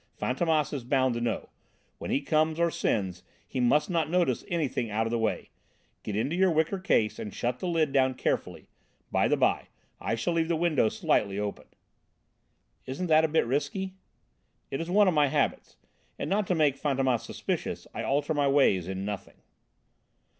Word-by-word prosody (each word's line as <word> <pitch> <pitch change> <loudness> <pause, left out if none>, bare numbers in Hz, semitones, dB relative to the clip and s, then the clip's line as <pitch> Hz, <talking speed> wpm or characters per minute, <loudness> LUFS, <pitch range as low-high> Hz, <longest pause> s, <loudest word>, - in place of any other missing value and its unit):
Fantômas 155 +3 0
is 135 -4 -3
bound 130 0 +2
to 120 - -3
know 120 -1 +1
it: - - -21 0.5
when - - -6
he 140 - +1
comes 155 +2 +1
or 170 0 +2
sends, 95 - -1 0.3
he - - -4
must 125 +5 +3
not 165 -4 0
notice 175 0 +1
anything 150 -9 -1
out 110 +2 0
of 115 - -2
the 120 - 0
way. 110 -1 -2 0.5
Get 105 - -5
into 135 +10 0
your 190 +1 +4
wicker 160 +4 +1
case 115 - +1
and 105 - -5
shut 125 +4 -2
the - - -3
lid 160 -4 +1
down 130 -1 +3
carefully. - - -2 0.5
By - - +2
the - - +2
by, - - +1 0.3
I - - -1
shall 145 +10 -1
leave 165 -1 +1
the 170 - +1
window 155 -8 +2
slightly 100 -2 0
open." 105 -1 -4 1.2
"Isn't 135 +8 -3
that 155 +1 +6
a - - +2
bit 160 -3 +2
risky?" 145 +9 -2 0.8
"It 135 - -2
is 165 - -5
one 205 +2 +5
of 185 - +3
my 150 -2 +4
habits, - - -1 0.4
and - - -3
not 205 -1 +1
to 180 - +1
make 145 -4 +2
Fantômas 135 -4 +1
suspicious - - -4
I - - -4
alter 145 +3 0
my 145 -2 +2
ways 135 - +3
in 95 +1 -4
nothing." 105 -2 -6
145 Hz, 190 wpm, -28 LUFS, 120-165 Hz, 1.2 s, that